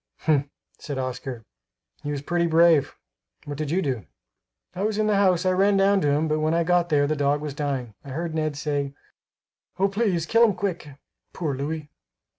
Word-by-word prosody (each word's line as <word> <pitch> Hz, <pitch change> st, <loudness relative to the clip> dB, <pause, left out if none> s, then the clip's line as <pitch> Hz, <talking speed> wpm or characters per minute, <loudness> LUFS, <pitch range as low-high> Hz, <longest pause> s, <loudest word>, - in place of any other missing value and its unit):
"Humph," 145 Hz, -3 st, +2 dB, 0.3 s
said 145 Hz, -2 st, -5 dB
Oscar, 130 Hz, -2 st, -4 dB, 0.6 s
"he 145 Hz, -, -5 dB
was 145 Hz, -1 st, -3 dB
pretty 170 Hz, +2 st, +1 dB
brave; 165 Hz, -2 st, +4 dB, 0.5 s
what 145 Hz, -, -5 dB
did 155 Hz, -2 st, -2 dB
you 185 Hz, +5 st, +1 dB
do?" 125 Hz, -, -3 dB, 0.7 s
"I 185 Hz, -, -5 dB
was 210 Hz, 0 st, 0 dB
in 215 Hz, -, +2 dB
the 210 Hz, -1 st, +2 dB
house; 185 Hz, -2 st, +3 dB
I 185 Hz, -, +3 dB
ran 195 Hz, +2 st, +3 dB
down 195 Hz, 0 st, +4 dB
to 145 Hz, -, +2 dB
him, 150 Hz, +3 st, +2 dB
but 155 Hz, 0 st, 0 dB
when 155 Hz, +1 st, +1 dB
I 170 Hz, -, +2 dB
got 175 Hz, 0 st, +2 dB
there 145 Hz, -3 st, +3 dB
the 155 Hz, +2 st, 0 dB
dog 145 Hz, 0 st, +1 dB
was 150 Hz, -1 st, -5 dB
dying. 135 Hz, -5 st, -3 dB
I 140 Hz, -, -11 dB
heard 160 Hz, +4 st, -3 dB
Ned 155 Hz, -2 st, -1 dB
say, 145 Hz, -2 st, -2 dB, 0.8 s
'Oh! 195 Hz, +1 st, +3 dB
please 195 Hz, -5 st, 0 dB
kill 230 Hz, +6 st, +4 dB
him 215 Hz, -5 st, +4 dB
quick. 180 Hz, -5 st, -3 dB, 0.4 s
Poor 155 Hz, -5 st, -2 dB
Louis!'" 150 Hz, +3 st, -4 dB
155 Hz, 200 wpm, -25 LUFS, 145-180 Hz, 0.8 s, brave